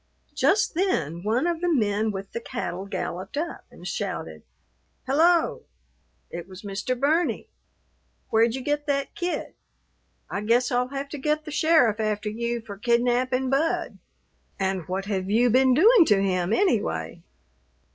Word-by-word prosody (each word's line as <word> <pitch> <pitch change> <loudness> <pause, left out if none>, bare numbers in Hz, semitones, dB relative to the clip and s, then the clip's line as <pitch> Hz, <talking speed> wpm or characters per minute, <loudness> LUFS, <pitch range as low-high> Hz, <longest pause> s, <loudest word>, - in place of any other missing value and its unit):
Just 415 - +2
then 170 - -1
one 225 - 0
of 340 -1 -1
the 355 -1 +1
men 215 -5 +1
with 195 -1 -6
the - - -4
cattle 200 -6 -5
galloped 190 +2 -5
up 330 +3 -4
and - - -11
shouted, - - -4 0.6
"Hello!" 330 +5 +2 0.7
It 170 +1 -6
was 190 +1 -12
Mr. 210 +5 -3
Burney! 315 +6 +1 0.8
"Where'd 225 +1 +3
you 265 - -4
get 290 +2 -2
that 280 -1 -1
kid? 355 0 -3 0.7
I 200 - -4
guess 240 +4 +2
I'll 250 0 +1
have 275 +1 -5
to 295 - -6
get 305 +2 -1
the 305 - -7
sheriff 295 -8 +3
after 210 -1 -1
you 235 +2 -3
for 205 -3 -10
kidnapping 250 +3 +1
Bud. 310 +5 0 0.6
And 190 -3 -1
what 190 +1 -3
have 195 -2 -2
you 235 +3 +3
been 260 +1 +4
doing 410 - +7
to 210 -8 +4
him, 185 -1 0
anyway?" 205 - 0
240 Hz, 150 wpm, -25 LUFS, 200-290 Hz, 0.8 s, doing